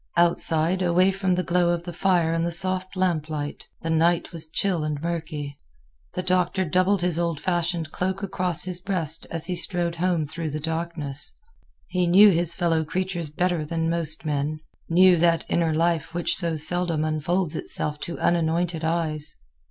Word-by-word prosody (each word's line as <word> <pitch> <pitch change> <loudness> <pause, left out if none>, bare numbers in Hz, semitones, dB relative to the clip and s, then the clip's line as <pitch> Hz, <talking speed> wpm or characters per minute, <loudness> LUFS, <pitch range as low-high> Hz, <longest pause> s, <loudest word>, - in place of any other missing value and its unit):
Outside, 170 +1 +2
away 180 +2 +3
from 190 -1 0
the 180 - -1
glow 175 +1 +2
of 170 -1 -1
the 175 0 -7
fire 175 -2 +2
and 165 0 0
the 170 - 0
soft 185 +2 +1
lamplight, 155 -5 -2 0.2
the 165 - -1
night 165 +1 +2
was 160 -1 -3
chill 180 -1 0
and 150 -1 -2
murky. 155 -3 -5 0.6
The 180 - -2
Doctor 185 +1 +1
doubled 185 +3 +2
his 175 -2 +1
old 170 -3 -1
fashioned 175 -2 -1
cloak 190 +2 -2
across 180 -3 +1
his 180 -1 -2
breast 170 -4 -1
as 165 -1 +1
he 180 0 -2
strode 175 -1 0
home 175 -2 0
through 160 +2 -5
the 150 +1 -4
darkness. 160 -3 -1 0.6
He 180 -1 0
knew 200 +4 +7
his 170 -1 +1
fellow 165 -3 +1
creatures 175 0 -3
better 175 +1 0
than 165 +1 -2
most 160 -1 -2
men; 150 +1 -2 0.3
knew 180 +1 +6
that 165 0 +2
inner 165 -2 +1
life 165 +1 0
which 175 - +2
so 170 -3 0
seldom 165 0 -1
unfolds 155 +2 -1
itself 150 -1 -1
to 170 +3 -5
unanointed 170 0 0
eyes. 160 -2 -1
170 Hz, 170 wpm, -24 LUFS, 160-180 Hz, 0.6 s, knew